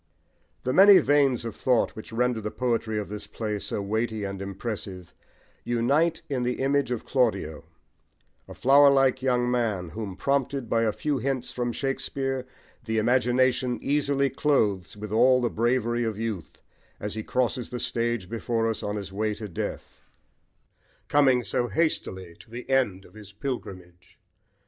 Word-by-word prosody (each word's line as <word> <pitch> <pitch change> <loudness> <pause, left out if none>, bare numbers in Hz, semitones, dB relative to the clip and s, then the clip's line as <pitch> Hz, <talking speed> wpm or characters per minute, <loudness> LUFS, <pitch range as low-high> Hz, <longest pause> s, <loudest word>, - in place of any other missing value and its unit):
The 130 - 0
many 195 +3 +9
veins 140 -6 +3
of 115 -3 -5
thought 125 -3 +1
which 110 - -9
render 120 0 0
the 105 - -3
poetry 115 -2 -1
of 105 - -3
this 105 0 -7
play 105 -2 -3
so 100 - -3
weighty 110 +1 -1
and 100 -1 -4
impressive 100 -2 -6 0.5
unite 140 +8 +1
in 135 -4 -2
the 125 0 0
image 140 0 +1
of 125 -3 -3
Claudio, 100 - 0 0.8
a - - -10
flowerlike 135 -1 +5
young 125 -2 +1
man, 110 -8 -1
whom, 105 -1 -6
prompted 140 +1 -1
by 115 0 +1
a 110 - +2
few 145 +5 -2
hints 130 0 -2
from 120 -1 -2
Shakespeare, 135 0 -2 0.4
the 110 -1 -2
imagination 125 +2 +2
easily 140 -1 +1
clothes 105 - 0
with 105 0 -7
all 125 +3 +5
the 120 -2 0
bravery 120 0 +1
of 110 -3 -2
youth, 110 -7 -5 0.4
as 105 0 -4
he 110 - -3
crosses 125 +1 -1
the 125 - -5
stage 120 -5 -1
before 115 +1 -1
us 110 -2 -2
on 105 0 -3
his 100 -2 -6
way 105 +1 -1
to 105 0 -6
death, 90 - -6 1.1
coming 130 -4 +4
so 120 - -1
hastily 95 - -1
to - - -16
the 120 +2 -8
end 105 -8 +1
of - - -18
his 105 -2 -12
pilgrimage. 95 -7 -7
120 Hz, 160 wpm, -26 LUFS, 105-130 Hz, 1.1 s, many